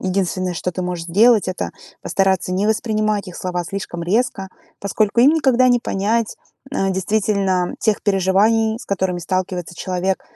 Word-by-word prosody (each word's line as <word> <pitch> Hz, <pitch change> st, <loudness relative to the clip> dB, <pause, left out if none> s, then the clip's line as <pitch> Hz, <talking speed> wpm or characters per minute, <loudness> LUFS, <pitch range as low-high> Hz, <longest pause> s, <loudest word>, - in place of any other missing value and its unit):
единственное, 185 Hz, -1 st, -1 dB
что 175 Hz, +1 st, -3 dB
ты 185 Hz, +1 st, -4 dB
можешь 180 Hz, -2 st, -4 dB
сделать, 215 Hz, +4 st, +4 dB
это 185 Hz, -, -3 dB, 0.3 s
постараться 190 Hz, -2 st, +1 dB
не 190 Hz, +3 st, 0 dB
воспринимать 215 Hz, -2 st, 0 dB
их 180 Hz, -, -9 dB
слова 180 Hz, -1 st, -3 dB
слишком 175 Hz, -2 st, -5 dB
резко. 195 Hz, +1 st, 0 dB, 0.3 s
Поскольку 210 Hz, +3 st, +1 dB
им 265 Hz, +4 st, +7 dB
никогда 260 Hz, -5 st, +3 dB
не 245 Hz, -1 st, +3 dB
понять, 215 Hz, +2 st, -1 dB, 0.3 s
э, 195 Hz, -7 st, 0 dB
действительно 190 Hz, -1 st, 0 dB
тех 215 Hz, -2 st, 0 dB
переживаний, 210 Hz, +3 st, +2 dB
с -, -, -10 dB
которыми 190 Hz, -2 st, -1 dB
сталкивается 180 Hz, -1 st, -3 dB
человек, 185 Hz, +2 st, -2 dB
195 Hz, 150 wpm, -20 LUFS, 185-215 Hz, 0.3 s, им